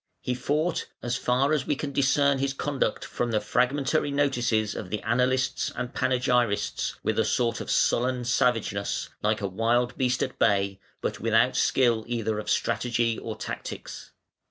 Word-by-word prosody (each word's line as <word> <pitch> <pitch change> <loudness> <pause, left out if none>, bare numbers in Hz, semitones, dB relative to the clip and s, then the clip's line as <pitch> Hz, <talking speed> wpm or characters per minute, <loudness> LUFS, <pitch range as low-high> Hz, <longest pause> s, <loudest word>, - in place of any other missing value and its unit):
He 125 - -2
fought 150 +6 -1 0.2
(as 120 0 -1
far 130 +4 +1
as 150 -4 0
we 145 - +1
can 140 0 -4
discern 140 0 +3
his 135 0 -1
conduct 140 -1 -1
from 120 - -2
the 110 -2 +1
fragmentary 130 +7 +1
notices 120 -7 +1
of 90 - -6
the 105 - -2
annalists 125 +3 +1
and 125 -1 -4
panegyrists) 125 -4 0
with - - 0
a - - +4
sort 115 -2 0
of - - -7
sullen 125 0 +1
savageness, 115 -5 0
like 105 0 +1
a 100 - -1
wild 120 +5 +1
beast 130 0 +1
at - - -5
bay, 100 -1 +2 0.2
but - - -3
without - - +3
skill 120 -4 +2
either 110 -3 -1
of 105 - -5
strategy 115 -1 0
or 110 -1 -5
tactics. - - -7
125 Hz, 160 wpm, -26 LUFS, 110-135 Hz, 0.2 s, a